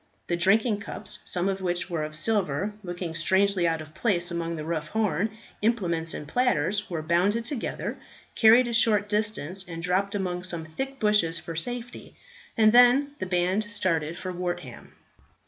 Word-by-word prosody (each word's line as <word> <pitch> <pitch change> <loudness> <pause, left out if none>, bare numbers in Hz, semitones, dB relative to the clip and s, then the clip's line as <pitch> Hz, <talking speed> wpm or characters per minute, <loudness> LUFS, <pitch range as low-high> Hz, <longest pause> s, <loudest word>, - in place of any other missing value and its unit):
The 175 - -1
drinking 205 +5 +3
cups, 205 0 -4
some 180 +1 0
of 195 -1 -2
which 175 -1 -1
were 170 -4 -2
of 155 0 -5
silver, 200 0 0
looking 175 -2 -5
strangely 190 +2 +2
out 165 -1 0
of 155 0 -12
place 175 -5 0
among 170 0 -2
the 155 -1 -6
rough 160 -2 -2
horn 210 -1 0 0.3
implements 175 -8 0
and 150 - -7
platters, 210 - +1
were 165 -3 -3
bundled 185 +8 +1
together, 270 -3 -3 0.4
carried 235 +2 +6
a 235 - -3
short 215 -3 +3
distance 205 -4 -1
and 165 -1 -7
dropped 190 +3 0
among 180 -2 -2
some 170 -3 -4
thick 270 +12 -5
bushes 210 -6 +2
for 165 - -7
safety; 245 +8 -5 0.4
and 215 -1 +6
then 245 +4 +6
the 185 - -3
band 180 +3 +1
started 170 -6 -1
for 185 - -5
Wortham. 175 -8 -5
185 Hz, 165 wpm, -26 LUFS, 170-215 Hz, 0.4 s, carried